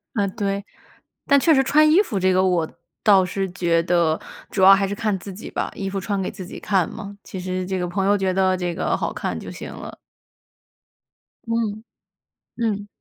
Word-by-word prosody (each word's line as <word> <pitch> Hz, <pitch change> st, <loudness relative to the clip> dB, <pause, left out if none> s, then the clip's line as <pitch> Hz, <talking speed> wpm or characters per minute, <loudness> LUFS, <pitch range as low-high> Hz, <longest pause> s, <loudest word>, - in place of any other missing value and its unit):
呃， 200 Hz, -2 st, +1 dB
对。 200 Hz, -1 st, -3 dB, 0.6 s
但 280 Hz, -1 st, +5 dB
确 320 Hz, +3 st, +4 dB
实 270 Hz, -1 st, +4 dB
穿 305 Hz, +3 st, +4 dB
衣 350 Hz, +6 st, +6 dB
服 210 Hz, -, -2 dB
这 185 Hz, 0 st, +3 dB
个 185 Hz, +1 st, +3 dB
我 175 Hz, -4 st, +1 dB, 0.3 s
倒 195 Hz, -3 st, +6 dB
是 190 Hz, +1 st, -2 dB
觉 170 Hz, -2 st, +1 dB
得， 170 Hz, -2 st, +2 dB, 0.3 s
主 190 Hz, -, -2 dB
要 195 Hz, +1 st, +9 dB
还 195 Hz, 0 st, +3 dB
是 200 Hz, -, -3 dB
看 215 Hz, -3 st, -1 dB
自 195 Hz, +1 st, -8 dB
己 200 Hz, -, -9 dB
吧。 -, -, -2 dB
衣 195 Hz, -1 st, -3 dB
服 195 Hz, 0 st, -3 dB
穿 200 Hz, +1 st, -2 dB
给 -, -, -2 dB
自 185 Hz, -, -8 dB
己 -, -, -9 dB
看 190 Hz, -4 st, +1 dB
嘛， 205 Hz, -2 st, -8 dB
其 190 Hz, -, -7 dB
实 185 Hz, 0 st, -3 dB
这 190 Hz, 0 st, -2 dB
个 180 Hz, -, -1 dB
朋 190 Hz, +2 st, -1 dB
友 205 Hz, +1 st, +4 dB
觉 190 Hz, -1 st, 0 dB
得 190 Hz, 0 st, +2 dB
这 175 Hz, -1 st, -2 dB
个 -, -, 0 dB
好 -, -, -2 dB
看 -, -, -3 dB
就 -, -, -8 dB
行 -, -, -8 dB
了。 -, -, -9 dB, 1.5 s
嗯， 225 Hz, -2 st, -1 dB, 0.7 s
嗯。 210 Hz, -3 st, -1 dB
195 Hz, 220 characters per minute, -22 LUFS, 185-210 Hz, 1.5 s, 要